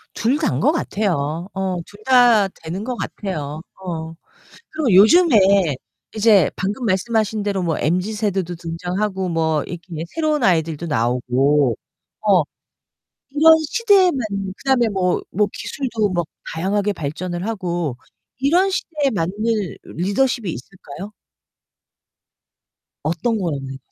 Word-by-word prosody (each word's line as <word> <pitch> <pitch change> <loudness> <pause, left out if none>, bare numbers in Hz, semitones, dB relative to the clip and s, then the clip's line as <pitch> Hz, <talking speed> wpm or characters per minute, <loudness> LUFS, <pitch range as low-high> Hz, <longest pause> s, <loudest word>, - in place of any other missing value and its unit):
둘 250 +6 +1
다인 305 - 0
거 295 - +4
같아요. 175 - -1
어 190 -2 -2
둘 205 0 -16
다 245 -6 +5 0.2
되는 180 +6 -4
거 250 +1 -3
같아요. 155 -9 -5 0.2
어. 165 -3 -5 0.6
그리고 300 -9 0
요즘에 200 - +5 0.4
이제 210 -6 +4
방금 210 +6 -3
말씀하신 215 +2 0
대로 200 -2 -1
뭐 165 -2 -1
MZ 180 +7 0
세대도 195 -5 -1
등장하고, 180 +3 -3
뭐 160 -2 0
이렇게 170 -2 -7
새로운 310 -4 -1
아이들도 165 -4 +1
나오고 125 +1 +1 0.5
어 195 -6 +4 0.9
이런 320 +3 +7 0.2
시대에 405 -6 +4
맞는 200 -7 -3
그다음에 260 -4 +2
뭐 185 -3 0
뭐 210 +1 +2
기술도 230 -7 -2
뭐 175 -2 0 0.3
다양하게 200 +5 0
발전을 175 +3 -4
하고 175 - -2 0.4
이런 350 +9 +3
시대에 300 -7 -1
맞는 170 0 -1 0.5
리더십이 205 +3 -1
있을까요? 185 - -9 1.9
어떤 175 +9 0
거였나요? 140 -7 -3
190 Hz, 265 characters per minute, -20 LUFS, 165-225 Hz, 1.9 s, 이런